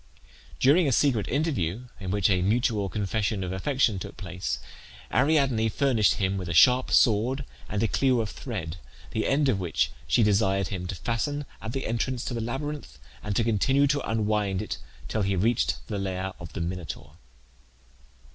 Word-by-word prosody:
During 150 +5 +5
a - - +2
secret 120 -4 +2
interview, 125 - -1
in 95 -3 -5
which 100 0 +2
a 90 -1 +2
mutual 105 0 +1
confession 105 0 -1
of 90 - -3
affection 110 0 +1
took - - -8
place, 90 -1 -3 0.6
Ariadne 135 -7 +3
furnished 115 -2 +2
him 95 0 0
with 90 -2 -5
a 85 - -2
sharp 125 +7 +6
sword 125 +5 +3 0.2
and 105 +1 -1
a - - +3
clue 130 +2 +2
of 110 -2 -2
thread, 90 - -5 0.3
the 110 - -1
end 140 +1 +2
of 115 -7 +2
which 85 -8 0 0.2
she 90 - +4
desired 100 -2 +2
him 90 -3 -4
to 95 - -4
fasten 145 - -2 0.2
at 110 +1 -5
the 135 - -3
entrance 120 +2 -1
to - - -3
the 115 - -2
labyrinth 140 - -5 0.2
and 105 -1 -3
to 115 - +3
continue 130 +6 +3
to 145 0 +1
unwind 105 -3 0
it 95 - -5 0.3
till 110 - -1
he 100 0 +1
reached 110 +6 +1
the 105 -2 -4
lair 95 -1 -3
of 80 -3 -9
the - - -4
Minotaur. 85 -2 -5
110 Hz, 175 wpm, -27 LUFS, 95-130 Hz, 0.6 s, sharp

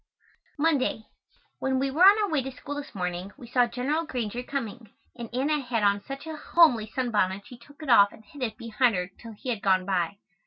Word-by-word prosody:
Monday. 290 -7 +1 0.6
When 265 0 0
we 270 +1 0
were 305 +6 -2
on 410 +3 +8
our 405 - 0
way 300 -3 +2
to 265 - -5
school 275 +2 -7
this 290 -4 -7
morning 180 +1 -3
we 260 - -11
saw 245 0 +3
General 265 +7 -1
Granger 245 -5 -3
coming, 245 -4 -5 0.3
and 235 -2 -7
Anna 285 +4 0
had 240 -4 -1
on 200 0 +3
such 275 +5 -8
a 320 -1 -5
homely 295 -10 +4
sunbonnet 205 -5 -1
she 245 - -11
took 285 +5 -15
it 290 - -6
off 205 -3 +7
and 220 - -16
hid 290 -4 -13
it 220 -4 -2
behind 230 0 +1
her 180 +1 -3
till 230 -1 -10
he 235 +5 -7
had 225 -4 -2
gone 190 -3 +2
by. 190 0 -1
245 Hz, 220 wpm, -27 LUFS, 210-280 Hz, 0.6 s, on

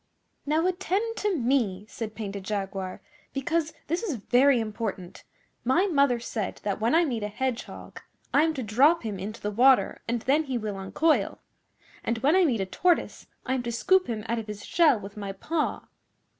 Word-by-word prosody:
'Now 315 +3 +2
attend 380 +5 -1
to 415 -4 0
me,' 230 -7 +1
said 215 0 -6
Painted 200 -2 -5
Jaguar, 195 -2 -4 0.3
'because 320 +3 -1
this 335 +3 -1
is 395 - -2
very 250 +4 +4
important. 210 -4 -5 0.4
My 260 +11 +3
mother 280 -9 +3
said 220 -4 -4
that 205 0 -2
when 230 +7 +3
I 340 +1 +5
meet 240 -7 -2
a 210 - -1
Hedgehog 250 +3 -5 0.3
I 290 - +6
am 320 0 +1
to 260 - -3
drop 270 +10 +4
him 210 -4 -4
into 210 +4 -6
the 210 - -2
water 255 +5 +4
and 235 0 -1
then 295 +4 +2
he 260 -3 -2
will 210 -3 -4
uncoil, 305 +12 +1 0.7
and 230 - -1
when 280 +9 +3
I 375 -1 +5
meet 235 -9 +1
a - - 0
Tortoise 345 - 0 0.2
I 260 - 0
am 260 - 0
to 240 -1 -4
scoop 370 +11 +3
him 220 -3 -4
out 235 0 0
of 225 - -7
his 210 -1 -7
shell 305 -9 +4
with 200 +1 -10
my 200 -1 -4
paw. 305 +10 -2
240 Hz, 190 wpm, -27 LUFS, 210-310 Hz, 0.7 s, I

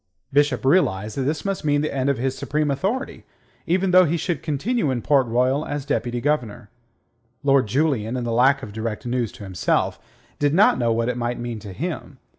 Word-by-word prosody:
Bishop 145 -3 +2
realized 110 - +2
that 140 - -2
this 155 +4 -3
must 195 -1 -2
mean 145 -1 +2
the 155 - -2
end 135 0 0
of 140 - +1
his 130 +2 -1
supreme 145 +2 -1
authority, 205 - -2 0.4
even 185 +2 +1
though 185 0 +7
he 170 +2 0
should 170 -2 -2
continue 165 - -1
in 120 -4 -2
Port 135 -3 +3
Royal 125 +5 +1
as 145 -2 -4
Deputy 120 -3 -1
Governor. 120 -7 -2 0.7
Lord 135 -4 +3
Julian, 130 -2 0
in 125 - -3
the 120 - -2
lack 135 +4 +3
of 105 - -8
direct 110 0 -4
news 120 -2 -1
to - - -11
himself, 95 -3 -1 0.4
did 145 +1 +2
not 195 -7 +5
know 120 -2 +2
what 115 +1 0
it 125 -1 -1
might 120 0 -2
mean 120 -2 -4
to 105 -2 -9
him. 90 - -5
135 Hz, 205 wpm, -23 LUFS, 120-150 Hz, 0.7 s, though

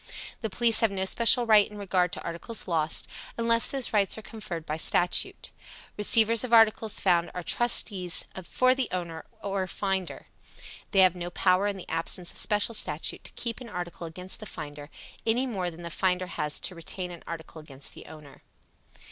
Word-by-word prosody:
The 220 - -3
police 230 +3 +4
have 225 - +4
no 190 -1 -2
special 235 +4 +4
rights 215 -3 +5
in 210 - -11
regard 185 -3 0
to - - -4
articles 170 +8 -5
lost, 160 -3 -1 0.3
unless 230 0 +3
those 270 -4 +1
rights 200 -1 +2
are 220 - -8
conferred 195 -7 -7
by 155 0 -3
statute. 175 +2 +2 0.4
Receivers 225 +2 +4
of 250 - -4
articles 225 -1 +4
found 175 -3 +2
are 180 - -4
trustees 195 -5 +1 0.2
for 255 +8 +2
the 260 -2 -2
owner 170 -3 -5 0.2
or 195 -2 -2
finder. 190 -2 -3 0.6
They 195 - +4
have 185 -1 +5
no 175 0 -5
power 185 +2 +2
in 200 -1 -3
the 185 - -10
absence 165 +2 +1
of - - -5
special 210 +1 +3
statute 155 -7 -2
to - - -4
keep 235 0 -4
an 240 - -9
article 175 -3 -6
against 180 +3 -5
the 215 - -8
finder, 145 -3 -8 0.3
any 235 +3 +1
more 190 -8 -2
than 170 0 -11
the 170 - -6
finder 185 +1 0
has 150 -4 -4
to - - 0
retain 180 +2 -4
an 175 - -10
article 165 -1 -8
against 140 -2 -10
the - - -12
owner. 150 -3 -13
185 Hz, 185 wpm, -27 LUFS, 170-220 Hz, 0.6 s, rights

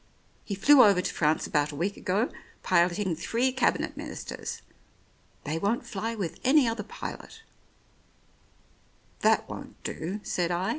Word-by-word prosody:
He 200 - -4
flew 275 +7 +7
over 200 -3 +5
to 180 - -2
France 155 0 +1
about 150 0 0
a - - -8
week 185 +7 -1
ago, 200 +7 0 0.3
piloting 175 +1 +2
three 235 +10 0
Cabinet 255 -1 0
Ministers. - - -6 0.8
They 155 +2 -2
won't 205 +6 0
fly 225 +3 -3
with 190 -7 -4
any 270 0 +5
other 230 -1 -1
pilot 450 - -8 0.9
" - - -35
"That - - +3
won't - - -8
do," 185 +6 -4
said 175 -2 -1
I. 180 +3 -1
195 Hz, 145 wpm, -28 LUFS, 170-230 Hz, 0.9 s, flew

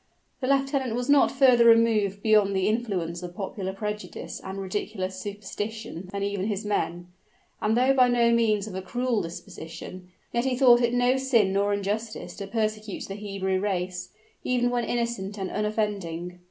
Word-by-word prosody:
The 255 - -2
lieutenant 270 -3 +1
was 245 +3 0
not 285 - +5
further 255 -3 +5
removed 220 -4 +4
beyond 210 -3 +4
the 190 0 +1
influence 195 -7 -1
of 175 -1 -8
popular 190 -1 -4
prejudice 210 +2 -5
and 190 +1 -6
ridiculous 190 0 -3
superstition 205 -1 -6
than 200 0 -3
even 200 -1 -1
his 210 0 -2
men: 175 -4 -2 0.5
and 220 +2 +2
though 260 +2 +4
by 255 -2 +5
no 240 -1 +3
means 220 -3 +2
of 215 - -8
a 190 - -3
cruel 240 +4 -1
disposition, 170 +2 -8 0.2
yet 235 - +1
he 255 -2 0
thought 245 -2 +6
it 240 0 +2
no 245 +1 +3
sin 235 -8 +2
nor 200 +1 +2
injustice 205 +3 -3
to 200 - -5
persecute 215 -1 -2
the 195 - -5
Hebrew 195 -2 -2
race, 180 -2 -2 0.3
even 245 -1 +1
when 240 -1 0
innocent 235 -4 -2
and 190 -2 -4
unoffending. 200 -5 -2
210 Hz, 165 wpm, -26 LUFS, 190-235 Hz, 0.5 s, thought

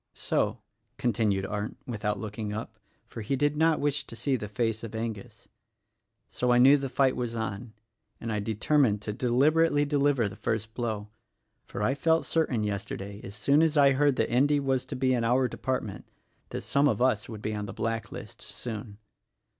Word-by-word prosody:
So," - - 0 0.4
continued 105 -5 +1
Arndt 105 +1 -4
without 105 -3 -2
looking 105 0 -5
up 110 0 -6
— - - -41
for 115 - -8
he 110 +6 -1
did 145 +2 +1
not 160 +1 +3
wish 145 0 0
to - - -8
see 135 +3 0
the 105 -4 -4
face 115 +1 -1
of 115 -1 -6
Angus, 110 -3 -6 0.4
— - - -54
"So, 125 0 0
I 120 - +5
knew 135 +3 +8
the 135 -2 -2
fight 130 0 +2
was 120 -2 -3
on, 110 0 -4 0.5
and 115 - -4
I 105 - 0
determined 110 +1 +1
to 105 - -3
deliberately 145 +6 +3
deliver 145 -5 +2
the 100 - -8
first 110 +1 -3
blow; 110 -3 -3 0.6
for 105 - -4
I 125 - +2
felt 160 +4 +2
certain 135 -9 +1
yesterday 100 0 -4
— - - -22
as 100 - -8
soon 140 +5 +3
as 160 -1 +2
I 140 -1 +6
heard 140 0 +3
that - - 0
Endy 145 +4 +3
was 135 -2 0
to - - -6
be 130 0 +2
in 120 -2 +1
our 125 +3 +3
department 125 -6 -4 0.2
— - - -41
that - - -4
some 140 +1 +2
of - - +1
us 125 -4 +1
would 110 -2 -8
be 110 - -2
on 105 -1 -4
the - - -5
black 115 +2 -3
list, - - -9
soon." 110 -3 -7
120 Hz, 200 wpm, -28 LUFS, 105-135 Hz, 0.6 s, knew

